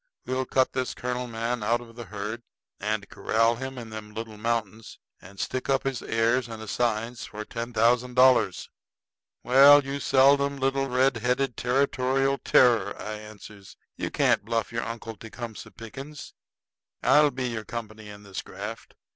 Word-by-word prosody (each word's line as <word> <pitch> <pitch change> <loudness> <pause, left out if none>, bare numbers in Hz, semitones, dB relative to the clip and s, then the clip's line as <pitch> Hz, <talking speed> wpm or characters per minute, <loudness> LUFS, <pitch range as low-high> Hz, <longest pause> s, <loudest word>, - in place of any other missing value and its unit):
We'll 130 0 -2
cut 130 -1 +2
this 130 -1 -2
colonel 125 0 -3
man 115 +1 -3
out 115 +3 +1
of 115 -1 -13
the 120 -1 -8
herd, 105 +4 -5 0.4
and 105 0 -2
corral 115 +1 +1
him 130 +1 -6
in 115 -2 -8
them 105 -1 -9
little 110 -1 -6
mountains, 110 -1 -3 0.2
and 100 +2 -14
stick 130 +1 -3
up 135 -1 +2
his 135 -2 -2
heirs 115 +2 +1
and 110 -1 -8
assigns 115 +1 -2
for 105 +1 -7
ten 115 +2 -5
thousand 120 +1 +2
dollars." 130 0 +4 0.8
"Well, 140 +3 +8
you 140 +1 -3
seldom 140 +1 +4
little 135 0 0
red 130 0 +2
headed 125 +2 0
territorial 135 +1 +1
terror," 115 -5 +3
I 110 - -5
answers, 105 -2 -11 0.2
"you - - -3
can't - - +2
bluff 115 0 -2
your 115 0 -2
uncle 115 -1 -6
Tecumseh 115 0 -8
Pickens! 135 +6 -10 0.7
I'll 150 0 +6
be 130 -2 -3
your 110 -2 -4
company 110 -2 -7
in 105 0 -11
this 100 -2 -6
graft. - - -8
120 Hz, 160 wpm, -26 LUFS, 110-130 Hz, 0.8 s, Well